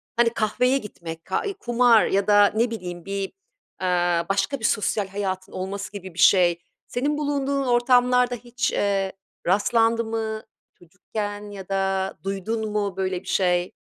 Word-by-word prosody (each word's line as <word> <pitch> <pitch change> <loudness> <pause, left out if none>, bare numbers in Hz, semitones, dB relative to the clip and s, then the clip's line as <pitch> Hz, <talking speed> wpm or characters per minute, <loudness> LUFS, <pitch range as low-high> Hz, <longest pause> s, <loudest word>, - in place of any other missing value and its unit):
hani, 235 0 +4
kahveye 235 +4 +1
gitmek 165 -8 -8
ka 190 - -1
eee, 400 - -2
kumar 240 -2 +4
ya 195 +1 +1
da 205 -1 +6
ne 230 +2 +2
bileyim 180 -6 -6
bir, 195 0 -3 0.5
eee, 175 -2 +2
başka 195 +8 0
bir 220 - -3
sosyal 210 -1 +1
hayatın 190 -1 -4
olması 195 +2 -5
gibi 190 -3 -8
bir 170 - -10
şey. 175 -2 +5 0.3
Senin 285 +4 -1
bulunduğun 280 -2 0
ortamlarda 245 0 +3
hiç, 245 +1 -2
eee, 195 -1 0 0.4
rastlandı 225 +4 +3
mı 220 -1 -3 0.4
çocukken 205 +4 -6
ya 195 -2 -9
da 195 0 0
duydun 210 +3 -3
mu 200 -3 -2
böyle 185 -1 -1
bir - - -18
şey? 180 -1 +1
205 Hz, 150 wpm, -24 LUFS, 190-235 Hz, 0.5 s, da